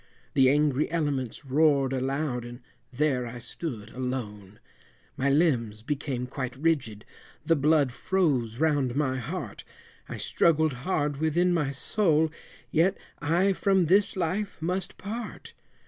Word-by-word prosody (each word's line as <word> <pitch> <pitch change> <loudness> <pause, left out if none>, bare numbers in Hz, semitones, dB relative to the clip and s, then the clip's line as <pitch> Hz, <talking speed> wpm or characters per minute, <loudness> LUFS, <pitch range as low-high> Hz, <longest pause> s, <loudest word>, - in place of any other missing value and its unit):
The 130 -1 +5
angry 145 0 +2
elements 145 -6 -2
roared 140 -1 +3
aloud, 135 -1 -1
and 120 +1 -9 0.3
there 130 -2 0
I 120 +1 -7
stood 120 -3 -6
alone, 110 -6 -5 0.6
My 135 +1 +1
limbs 125 -8 +1
became 135 -2 -2
quite 130 -1 -5
rigid, 130 -8 -1 0.4
the 165 - +4
blood 145 -2 +3
froze 130 -8 0
round 145 -5 +1
my 135 -3 0
heart, 125 - -5 0.5
I - - -5
struggled 160 -3 +2
hard 145 +1 -1
within 165 +4 +2
my 150 -5 +1
soul, 160 +2 +1 0.4
yet 180 +5 +3 0.2
I 175 +6 +2
from 190 -1 +2
this 195 +5 +3
life 190 +3 -2
must 180 +3 -2
part. 215 +2 -7
145 Hz, 130 wpm, -27 LUFS, 125-165 Hz, 0.6 s, The